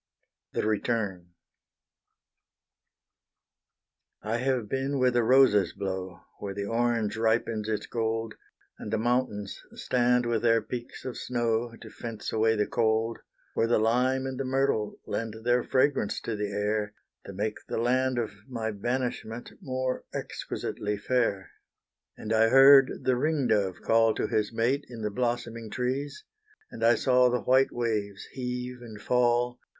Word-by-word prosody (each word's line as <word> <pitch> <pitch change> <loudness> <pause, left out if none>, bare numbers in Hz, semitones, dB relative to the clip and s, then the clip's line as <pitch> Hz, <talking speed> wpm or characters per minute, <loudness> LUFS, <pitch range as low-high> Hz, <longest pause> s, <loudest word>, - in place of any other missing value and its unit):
THE - - -1
RETURN 105 -4 -1 3.0
I 110 +3 -1
have 125 -3 0
been 135 +4 -1
where 130 -1 +3
the 120 0 +2
roses 115 -6 +4
blow, 95 -2 -5 0.2
Where 100 -1 -5
the 100 0 -3
orange 115 -1 0
ripens 110 -1 0
its 110 - -2
gold, 115 -1 -2 0.5
And - - -6
the - - +1
mountains 115 -3 -1
stand 125 0 +2
with 115 -2 0
their 115 -1 +4
peaks 120 +1 -7
of 130 - -5
snow, 120 -1 -1
To 110 - -11
fence 115 -3 -6
away 110 0 +3
the 105 -1 +1
cold, 115 +1 0 0.3
Where 115 - +1
the 120 - +3
lime 125 +4 +2
and 130 -1 -4
the - - 0
myrtle 130 -5 0
lent 115 -1 -3
Their 120 0 +2
fragrance 130 -5 +1
to 115 - -3
the 105 -1 -2
air, 105 +1 -1 0.3
To 100 - -7
make 105 +3 -2
the - - -3
land 130 +2 +1
of 115 -3 -1 0.2
my 115 -3 -3
banishment 120 +1 -3
More 130 -1 -2
exquisitely 105 0 -4
fair. 100 -3 0 0.7
And 110 - -3
I 110 0 +4
heard 135 +1 +8
the 130 -1 +2
ring 150 0 +1
dove 100 -5 +1
call 115 -1 +3
To - - -1
his 105 0 0
mate 120 +6 0
in 115 -3 -8
the 105 - -1
blossoming 120 -1 -2
trees, 130 - -3 0.5
And 115 - -6
I 115 +1 +6
saw 125 +1 +4
the 125 0 0
white 130 +1 +4
waves 105 -4 -2
heave 125 -1 -5
and 110 -3 -10
fall. 120 +1 +1
115 Hz, 150 wpm, -28 LUFS, 110-125 Hz, 3.0 s, heard